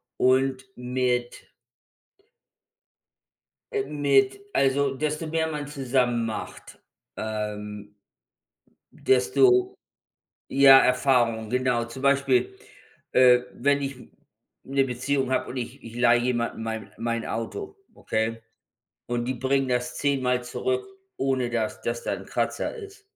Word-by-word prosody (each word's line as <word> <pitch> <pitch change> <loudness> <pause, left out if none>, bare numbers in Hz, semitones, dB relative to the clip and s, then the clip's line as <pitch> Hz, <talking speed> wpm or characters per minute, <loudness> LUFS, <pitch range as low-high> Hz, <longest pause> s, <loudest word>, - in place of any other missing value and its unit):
und 130 +1 +2
mit 125 -1 -2 2.2
äh, 415 -2 0
mit 140 - +2
also, 135 0 +2
desto 150 +3 -2
mehr 160 0 0
man 150 -2 -4
zusammen 125 -4 0
macht, 110 -1 -7 0.4
ähm, 105 -1 -5 1.0
desto 375 - +3 0.8
ja, 135 -1 +8
Erfahrung, 120 -4 +2
genau. 125 -2 +1
Zum 120 +3 -9
Beispiel, 140 -2 +2 0.6
äh, 125 -1 +6
wenn 140 +2 +1
ich 135 -1 -3 0.7
'ne 135 0 +1
Beziehung 130 +1 -1
habe 130 - 0
und 130 - -6
ich 120 - -6
ich 115 0 -10
leihe 120 -1 +4
jemanden 120 -2 -1
mein 110 -3 -5
mein 115 0 -2
Auto, 395 - -5 0.2
okay, 115 +1 -2 0.7
und 120 0 -2
die 130 - -1
bringen 135 +2 0
das 125 0 -1
10 140 -2 0
mal 125 -1 0
zurück, 390 - -2 0.3
ohne 130 -2 0
dass 115 -2 -2
dass 120 0 -3
da - - -1
'n - - -7
Kratzer - - -2
ist. 405 -2 -11
130 Hz, 120 wpm, -25 LUFS, 120-140 Hz, 2.2 s, ja